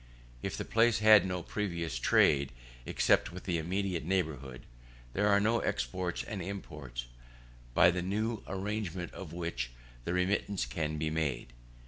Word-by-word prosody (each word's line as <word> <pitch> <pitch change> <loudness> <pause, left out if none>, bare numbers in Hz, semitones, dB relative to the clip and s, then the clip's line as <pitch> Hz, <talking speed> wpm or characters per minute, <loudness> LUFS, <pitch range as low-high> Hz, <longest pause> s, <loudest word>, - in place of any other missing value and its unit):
If - - -3
the - - -3
place 115 0 +4
had 110 -2 +7
no 90 -1 -2
previous 85 - -3
trade 70 +2 +4 0.4
except - - +3
with 90 +1 -8
the 85 -3 0
immediate 90 +1 -1
neighbourhood, 75 -8 -2 0.5
there 105 +2 +2
are 100 -1 +5
no 115 +3 +2
exports 90 -2 -2
and 105 -5 -5
imports, 75 -10 -6 0.7
by 85 - +7
the 90 +1 -2
new 105 +4 -1
arrangement 95 -2 -3
of 95 -5 -8
which, 85 -8 -3 0.3
the 85 - -2
remittance 95 -2 +1
can 75 +5 -2
be 80 0 -1
made. 70 -7 -2
90 Hz, 145 wpm, -32 LUFS, 75-100 Hz, 0.7 s, had